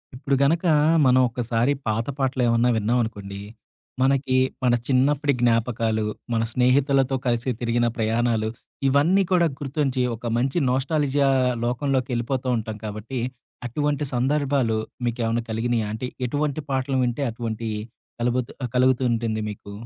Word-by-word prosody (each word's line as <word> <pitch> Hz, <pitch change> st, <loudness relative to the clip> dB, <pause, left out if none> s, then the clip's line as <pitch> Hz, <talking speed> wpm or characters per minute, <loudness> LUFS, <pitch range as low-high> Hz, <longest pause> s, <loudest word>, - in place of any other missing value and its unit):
ఇప్పుడు 135 Hz, +1 st, 0 dB
గనక 165 Hz, +5 st, +2 dB, 0.4 s
మనం 130 Hz, 0 st, +5 dB
ఒకసారి 120 Hz, +2 st, 0 dB, 0.2 s
పాత 110 Hz, +3 st, 0 dB
పాటలు 135 Hz, -1 st, 0 dB
ఏమన్నా 115 Hz, +1 st, +3 dB
విన్నామనుకోండి, 110 Hz, -3 st, -1 dB, 0.6 s
మనకి 135 Hz, -1 st, +2 dB, 0.3 s
మన 125 Hz, -1 st, +4 dB
చిన్నప్పటి 140 Hz, +2 st, +2 dB
జ్ఞాపకాలు, 115 Hz, -2 st, +1 dB, 0.3 s
మన 115 Hz, 0 st, +1 dB
స్నేహితులతో 135 Hz, +1 st, +3 dB
కలిసి 120 Hz, +1 st, 0 dB
తిరిగిన 120 Hz, 0 st, +1 dB
ప్రయాణాలు 115 Hz, 0 st, +1 dB, 0.4 s
ఇవన్నీ 155 Hz, +9 st, +4 dB
కూడా 175 Hz, -2 st, +4 dB
గుర్తుంచి 135 Hz, -2 st, -1 dB
ఒక 115 Hz, -, -12 dB
మంచి 130 Hz, +6 st, 0 dB
నొస్టాల్జియా 140 Hz, +1 st, +1 dB, 0.4 s
లోకంలోకేళ్ళిపోతూ 130 Hz, -1 st, -1 dB
ఉంటాం 110 Hz, -1 st, -5 dB
కాబట్టి. 110 Hz, +5 st, -5 dB, 0.5 s
అటువంటి 145 Hz, +3 st, -1 dB
సందర్భాలు 135 Hz, -2 st, +1 dB, 0.3 s
మీకేమన్నా 120 Hz, -1 st, -1 dB
కలిగినియా 115 Hz, 0 st, 0 dB
అంటే 120 Hz, +3 st, -4 dB, 0.2 s
ఎటువంటి 145 Hz, +3 st, -1 dB
పాటలు 135 Hz, 0 st, 0 dB
వింటే 120 Hz, +3 st, -1 dB
అటువంటి 115 Hz, -1 st, -4 dB, 0.5 s
కలుగుతు 120 Hz, +1 st, -1 dB, 0.2 s
కలుగుతూ 130 Hz, +1 st, +3 dB
ఉంటుంది 115 Hz, -1 st, -1 dB
మీకు? 100 Hz, 0 st, -9 dB
125 Hz, 120 wpm, -24 LUFS, 115-135 Hz, 0.6 s, మనం